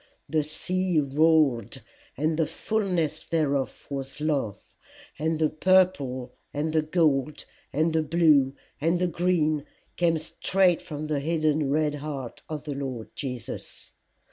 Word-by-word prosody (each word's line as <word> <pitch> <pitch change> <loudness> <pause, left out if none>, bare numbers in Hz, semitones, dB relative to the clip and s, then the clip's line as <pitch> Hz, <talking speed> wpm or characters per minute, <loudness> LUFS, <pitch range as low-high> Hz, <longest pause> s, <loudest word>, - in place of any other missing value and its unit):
The 155 -1 +1
sea 180 +3 0
roared, 145 -5 +2 0.3
and 155 +3 +1
the 160 -1 +1
fulness 180 -8 -1
thereof 145 -5 -1
was 135 0 -4
love; 140 -10 -1 0.6
and 160 +1 0
the 155 -1 +2
purple 155 -8 +2 0.2
and 155 +2 -2
the 160 - +4
gold 155 -3 +1 0.3
and 160 +3 +1
the 160 - +3
blue 150 -4 +4 0.3
and 165 +3 +2
the 180 - +1
green 165 -3 +1 0.3
came 170 -2 +3
straight 180 +3 +1
from 150 -1 -6
the 150 -2 -1
hidden 155 -1 +1
red 150 +1 +2
heart 145 -4 -6
of 150 -2 -4
the 150 -1 -4
Lord 130 -5 -5
Jesus. 125 -5 -6
155 Hz, 135 wpm, -26 LUFS, 140-165 Hz, 0.6 s, the